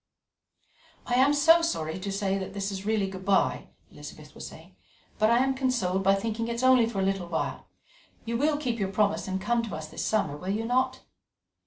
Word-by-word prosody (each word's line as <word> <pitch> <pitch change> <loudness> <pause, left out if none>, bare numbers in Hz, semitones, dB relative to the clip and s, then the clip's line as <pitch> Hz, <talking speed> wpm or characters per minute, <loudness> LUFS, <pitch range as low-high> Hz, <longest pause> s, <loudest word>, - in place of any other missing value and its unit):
"I 245 - -3
am 260 +3 +5
so 325 +4 +5
sorry 165 - -2
that 195 0 -2
this 200 0 -2
is 195 +1 -6
really 215 -3 +1
good 190 -1 -8
bye," 195 0 +1 0.2
Elizabeth - - -11
was - - -8
saying, - - -14 0.4
"but 215 0 +4
I 235 - +4
am 270 0 +1
consoled 240 -8 0
by 195 +1 +4
thinking 225 +3 -3
it 235 - -2
is 235 - -4
only 255 -3 +5
for 205 -4 -3
a - - +1
little 195 -2 -1
while. 165 -1 -3 0.6
You 230 +1 -2
will 290 +4 +1
keep 245 -6 -2
your 195 -1 -1
promise 205 0 +1
and 190 0 -2
come 235 +4 +1
to 230 -3 -5
us 155 0 -7
this - - -5
summer, 210 -9 0
will 180 +6 -7
you 215 +3 -1
not?" 255 +2 0
215 Hz, 205 wpm, -27 LUFS, 195-245 Hz, 0.6 s, am